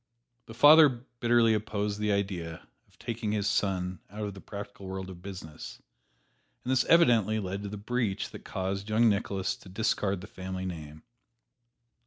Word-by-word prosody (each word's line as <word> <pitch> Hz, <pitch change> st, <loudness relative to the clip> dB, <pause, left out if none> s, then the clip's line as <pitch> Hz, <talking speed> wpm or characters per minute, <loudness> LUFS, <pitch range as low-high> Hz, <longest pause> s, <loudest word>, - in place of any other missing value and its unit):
The 115 Hz, -, -10 dB
father 150 Hz, +4 st, +9 dB, 0.3 s
bitterly 120 Hz, -1 st, +4 dB
opposed 105 Hz, -1 st, -2 dB
the 105 Hz, 0 st, +1 dB
idea 95 Hz, -5 st, -3 dB, 0.2 s
of -, -, -28 dB
taking 115 Hz, -3 st, -3 dB
his 105 Hz, -2 st, 0 dB
son 95 Hz, -4 st, 0 dB
out 105 Hz, +2 st, -6 dB
of 100 Hz, -, -4 dB
the 95 Hz, -, -11 dB
practical 100 Hz, -1 st, -8 dB
world 95 Hz, 0 st, -5 dB
of 90 Hz, -1 st, -11 dB
business, 90 Hz, -5 st, -8 dB, 0.9 s
and 125 Hz, -, -1 dB
this 130 Hz, -2 st, +3 dB
evidently 115 Hz, -, +4 dB
led 100 Hz, 0 st, -4 dB
to 100 Hz, -, -5 dB
the 105 Hz, -, -6 dB
breach 110 Hz, -1 st, -2 dB
that -, -, -10 dB
caused 95 Hz, +2 st, -3 dB
young 115 Hz, +2 st, +4 dB
Nicholas 100 Hz, +2 st, -1 dB
to 100 Hz, -, -14 dB
discard 100 Hz, -2 st, 0 dB
the -, -, -8 dB
family 95 Hz, 0 st, -6 dB
name. 80 Hz, -4 st, -7 dB
100 Hz, 165 wpm, -29 LUFS, 95-110 Hz, 0.9 s, father